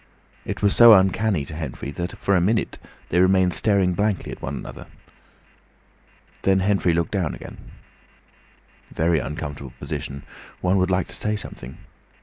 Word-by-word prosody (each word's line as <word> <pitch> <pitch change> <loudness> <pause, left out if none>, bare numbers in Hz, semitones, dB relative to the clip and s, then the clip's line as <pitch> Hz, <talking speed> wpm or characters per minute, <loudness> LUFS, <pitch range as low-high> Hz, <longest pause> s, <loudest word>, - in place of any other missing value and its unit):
It - - -5
was 100 - +4
so 120 -1 +9
uncanny 95 -4 +2
to 75 - -9
Henfrey 75 -3 -6
that 85 +5 -5
for 100 - +1
a 90 - +3
minute 105 +5 0 0.3
they 90 - +2
remained 95 -1 +4
staring 100 -5 +2
blankly 105 0 -1
at - - -9
one - - -4
another. - - -9 1.5
Then 95 0 +2
Henfrey 95 -2 +2
looked 85 0 0
down 95 -6 -1
again. - - -11 1.3
Very 80 0 +1
uncomfortable 70 0 -6
position! 70 -2 -5 0.4
One 95 +2 +2
would 95 0 +1
like 90 -1 0
to - - -4
say 105 0 -1
something. 65 -10 -8
90 Hz, 150 wpm, -23 LUFS, 80-100 Hz, 1.5 s, so